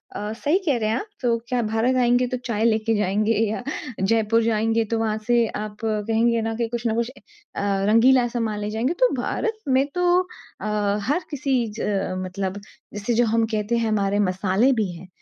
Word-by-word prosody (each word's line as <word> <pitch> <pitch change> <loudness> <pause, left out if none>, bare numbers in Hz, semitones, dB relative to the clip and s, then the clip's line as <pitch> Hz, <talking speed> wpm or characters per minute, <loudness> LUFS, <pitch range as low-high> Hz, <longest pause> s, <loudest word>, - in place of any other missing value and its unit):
अ, 210 +1 -4
सही 290 +9 +1
कह 285 -6 +2
रहे 215 -1 0
हैं 220 - +1
आप - - -7
तो 235 -2 +2
क्या 250 -1 0
भारत 225 +4 +1
आएँगे 245 +1 +3
तो 255 0 -3
चाय 220 -3 -1
लेके 225 0 +2
जाएँगे 210 +2 +1 0.2
या 220 - -3 0.4
जयपुर 225 +3 +2
जाएँगे 225 0 +1
तो 230 - +1
वहाँ 215 -1 0
से 240 -1 +4 0.2
आप 210 -1 -7
कहेंगे 225 +2 +1
ना 225 0 -2
कि 230 0 -1
कुछ 235 0 -4
न 220 - +1
कुछ 235 +1 0 0.5
अ, - - -2 0.3
रंगीला 245 +3 +5
समान 230 -3 -2
ले 210 0 -3
जाएँगे, 230 +8 -1
तो - - +3
भारत 450 -1 -2
में 265 +1 +3
तो 360 0 +1 0.6
अ, - - -5 0.4
हर 290 - +1
किसी 275 -2 0 0.2
च - - -6 0.4
मतलब 190 +1 -4 0.3
जैसे 210 +3 -2
जो 240 +1 +3
हम 225 0 +2
कहते 215 +2 0
हैं 230 -1 0
हमारे 205 -1 +1
मसाले 190 +5 +2
भी 215 -6 -1
हैं। 175 +2 -11
225 Hz, 195 wpm, -23 LUFS, 210-240 Hz, 0.6 s, रंगीला